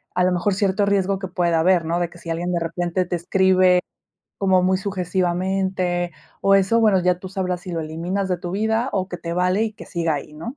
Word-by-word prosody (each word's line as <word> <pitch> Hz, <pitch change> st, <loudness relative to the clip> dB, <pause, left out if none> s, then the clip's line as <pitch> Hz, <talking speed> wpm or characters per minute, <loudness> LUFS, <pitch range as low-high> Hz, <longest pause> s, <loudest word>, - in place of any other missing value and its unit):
a 180 Hz, -, +2 dB
lo 185 Hz, -, +3 dB
mejor, 180 Hz, +2 st, 0 dB
cierto 200 Hz, 0 st, +1 dB
riesgo 195 Hz, -1 st, +1 dB
que 190 Hz, -, -4 dB
pueda 175 Hz, -2 st, +1 dB
haber, 175 Hz, 0 st, +3 dB
¿no? 170 Hz, +2 st, 0 dB
De 175 Hz, -1 st, -1 dB
que 175 Hz, -, -15 dB
si 170 Hz, -, -9 dB
alguien, 175 Hz, +2 st, -2 dB
de 175 Hz, -, +1 dB
repente, 175 Hz, +2 st, -1 dB
te 175 Hz, -, -2 dB
escribe 185 Hz, +1 st, +3 dB, 0.6 s
como 190 Hz, -2 st, +3 dB
muy 185 Hz, +1 st, +3 dB
sujesivamente, 185 Hz, -1 st, -1 dB, 0.3 s
o, 195 Hz, -, +5 dB
eso, 195 Hz, +4 st, +3 dB
bueno, 210 Hz, -4 st, +4 dB
ya 180 Hz, 0 st, +2 dB
tú 190 Hz, -, -7 dB
sabrás 185 Hz, -2 st, -2 dB
si 180 Hz, -, -7 dB
lo 165 Hz, -, -2 dB
eliminas 170 Hz, +5 st, -3 dB
de 180 Hz, -, 0 dB
tu 175 Hz, 0 st, -6 dB
vida, 220 Hz, +5 st, 0 dB
o, 190 Hz, -2 st, -1 dB
que 180 Hz, -, -5 dB
te 170 Hz, -1 st, -5 dB
vale 180 Hz, +4 st, +1 dB
y 220 Hz, -, -3 dB
que -, -, -12 dB
siga 170 Hz, -3 st, -1 dB
ahí, 145 Hz, +1 st, -6 dB
¿no? 230 Hz, -, -7 dB
185 Hz, 235 wpm, -22 LUFS, 175-195 Hz, 0.6 s, o